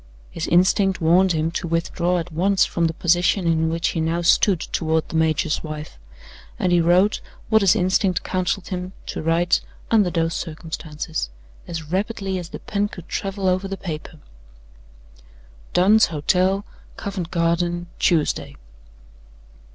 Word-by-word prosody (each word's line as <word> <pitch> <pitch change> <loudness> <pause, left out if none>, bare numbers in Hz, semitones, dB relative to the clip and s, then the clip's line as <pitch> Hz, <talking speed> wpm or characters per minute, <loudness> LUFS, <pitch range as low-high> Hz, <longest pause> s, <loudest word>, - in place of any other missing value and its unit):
His 165 - -4
instinct 190 +2 +3
warned 175 +2 +4
him 160 +1 0
to 175 +1 -3
withdraw 170 +2 0
at 175 0 -4
once 190 +5 +2
from 170 - -1
the 165 - -3
position 175 +2 +2
in 160 -1 +2
which 165 +1 0
he 165 - -2
now 165 +2 -1
stood 180 +1 +4
toward 160 -1 -1
the - - -6
major's 160 -1 +1
wife, 155 - -7 0.6
and 180 - 0
he 175 -1 +4
wrote 180 +5 +3 0.3
what 220 -1 +4
his 195 -3 +5
instinct 185 0 +1
counseled 185 0 -2
him 180 0 -4
to - - -5
write 165 +2 +2 0.3
under 210 -5 +4
those 165 -1 0
circumstances, 160 - -5 0.4
as 165 -2 -5
rapidly 195 -1 -2
as 170 -2 -7
the - - -7
pen 205 0 -2
could 180 -4 -11
travel 195 -1 -3
over 185 +1 +1
the 195 0 -5
paper: 160 -3 -7 1.6
"Dunn's 205 +5 +5
Hotel, 185 +6 +1 0.3
Covent 195 -5 -4
Garden, 175 0 0
Tuesday. 160 -4 +1
175 Hz, 145 wpm, -22 LUFS, 165-190 Hz, 1.6 s, his